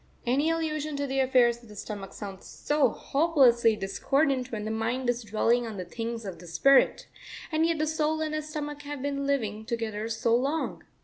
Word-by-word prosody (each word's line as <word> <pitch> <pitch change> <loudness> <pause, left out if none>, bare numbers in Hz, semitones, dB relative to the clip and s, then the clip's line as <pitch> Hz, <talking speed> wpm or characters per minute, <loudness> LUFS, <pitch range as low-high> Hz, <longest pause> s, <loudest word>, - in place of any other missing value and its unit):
Any 275 +6 +2
allusion 310 -2 -1
to 285 0 -1
the 270 0 -1
affairs 245 -3 +3
of 235 - -17
the 210 - -11
stomach 200 -1 -6
sounds 195 -2 -8
so 295 -1 +1
hopelessly 265 -7 +3
discordant 260 +6 0
when 210 -2 -4
the 220 - -2
mind 240 +3 0
is 240 0 -5
dwelling 230 +3 +1
on 215 -2 -6
the 185 - -4
things 230 +4 -5
of 185 -4 -6
the 175 - -12
spirit, 265 +12 +4 0.5
and 320 +1 +2
yet 335 -1 0
the 310 - +1
soul 315 0 0
and 310 -1 -2
the 310 - -1
stomach 295 -1 -5
have 290 -2 -6
been 280 -1 -2
living 220 -6 -1
together 225 -2 -3
so 230 +1 +1
long. 280 +6 -1
250 Hz, 195 wpm, -28 LUFS, 220-295 Hz, 0.5 s, spirit